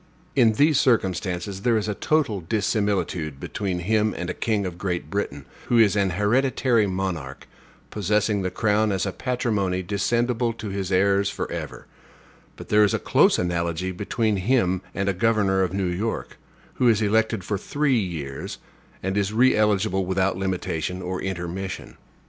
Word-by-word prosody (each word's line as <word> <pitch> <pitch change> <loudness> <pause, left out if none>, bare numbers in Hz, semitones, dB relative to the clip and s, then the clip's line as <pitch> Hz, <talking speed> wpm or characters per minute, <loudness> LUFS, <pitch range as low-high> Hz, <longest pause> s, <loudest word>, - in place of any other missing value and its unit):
In 115 -4 +5
these 145 +5 +4
circumstances 95 - 0
there 115 +1 +2
is 105 0 -2
a 105 - -1
total 135 -4 0
dissimilitude 100 -6 -1
between 90 +1 -3
him 110 +3 +1
and 90 +1 -3
a - - -4
king 105 -1 -1
of 90 -1 -6
Great 90 -2 -3
Britain, 70 -9 -3 0.2
who 120 - +3
is 110 -3 +5
an 100 -3 +1
hereditary 120 +1 +2
monarch, 90 -8 -4 0.4
possessing 105 0 +1
the 95 - -1
crown 110 +1 +1
as 95 0 0
a 100 - -1
patrimony 105 -7 -1
descendible 120 +5 0
to 110 -2 -5
his 95 -1 -3
heirs 100 +1 +3
forever; - - -5 0.7
but - - -11
there 105 0 +5
is 105 - +3
a - - +1
close - - +3
analogy 85 0 -1
between 105 +3 -1
him 95 -3 +1
and 100 0 -1
a 100 - +2
governor 100 -1 +2
of 95 - 0
New 95 0 -1
York, 95 +6 -3 0.4
who 125 - +5
is 110 -2 +3
elected 110 -1 +1
for 100 +1 -2
three 140 +1 +1
years, 80 -9 -5 0.5
and 95 +1 -1
is 100 0 0
re 125 +4 +4
eligible 105 -2 +2
without 95 +1 +1
limitation 90 -1 -3
or 90 0 -3
intermission. 95 0 -5
100 Hz, 160 wpm, -24 LUFS, 95-110 Hz, 0.7 s, In